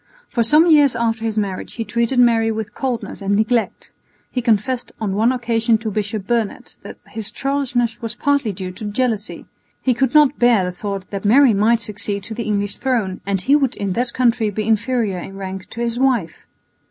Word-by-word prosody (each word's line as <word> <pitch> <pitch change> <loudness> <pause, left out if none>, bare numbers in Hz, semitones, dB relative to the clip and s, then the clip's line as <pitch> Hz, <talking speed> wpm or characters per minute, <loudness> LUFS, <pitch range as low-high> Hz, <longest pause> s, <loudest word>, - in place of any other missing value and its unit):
For 235 - 0
some 300 +8 +5
years 295 -6 +5
after 225 -1 -1
his 220 -1 -2
marriage 195 -3 -3
he 225 - -4
treated 235 +4 -1
Mary 230 -2 +4
with 215 -1 -5
coldness 250 -5 -4
and 200 +1 0
neglect. 220 +2 0 0.4
He 250 - -1
confessed 235 +2 0
on 210 -3 -2
one 220 +5 +3
occasion 230 -2 +1
to 220 0 -4
Bishop 205 0 -3
Burnet 230 -1 -2
that - - -10
his 220 -2 -6
churlishness 250 -4 -1
was 230 -2 -4
partly 285 -6 +1
due 185 -1 -6
to 185 +4 -9
jealousy; 220 0 -2 0.3
he 255 - +1
could 265 +3 0
not 295 -2 +5
bear 240 -5 +4
the 180 - -2
thought 195 +1 -5
that 200 -1 -4
Mary 245 +4 +5
might 220 +3 +3
succeed 205 -2 -4
to 220 - -7
the 230 +1 -4
English 205 -1 -1
throne 225 -8 -1
and 195 -2 0
he 275 +9 +3
would 275 -4 +1
in 200 -2 -2
that 240 +4 -1
country 235 -3 +1
be 210 +1 -3
inferior 225 -3 0
in 195 +2 -9
rank 190 -1 -7
to 235 - -6
his 235 0 -1
wife. 245 -11 0
225 Hz, 200 wpm, -19 LUFS, 205-245 Hz, 0.4 s, some